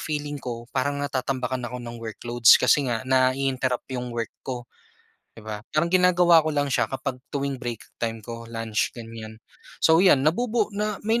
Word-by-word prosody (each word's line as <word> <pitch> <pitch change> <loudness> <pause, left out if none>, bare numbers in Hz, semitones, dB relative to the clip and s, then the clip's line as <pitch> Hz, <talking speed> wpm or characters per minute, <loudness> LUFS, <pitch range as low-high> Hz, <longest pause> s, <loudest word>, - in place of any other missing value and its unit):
feeling 145 -2 -4
ko 120 -2 -6
parang 145 +2 0
natatambakan 130 -2 -2
ako 125 - -6
ng 120 -1 -8
workloads 115 +1 +4
kasi 140 -3 +3
nga 115 0 -2
nai-interrupt 130 -1 +1
'yong 125 -1 -3
work 120 -1 -4
ko, 125 -2 -5 0.7
di 110 - -12
ba? 105 -1 -5
Parang 170 +3 0
ginagawa 180 -2 +6
ko 155 - -2
lang 145 -2 0
siya 120 -3 +2
kapag 130 -1 -4
tuwing 140 -2 -3
break 120 -4 -5 0.2
time 115 -2 -3
ko, 115 0 -8
lunch, 115 -2 -1
ganiyan. 115 -1 -9 0.5
So, 160 +1 +6
'yan 165 -8 +5
nabubuo 215 +6 +1
na 210 0 -2
may 225 +2 +2
130 Hz, 170 wpm, -25 LUFS, 120-150 Hz, 0.7 s, ginagawa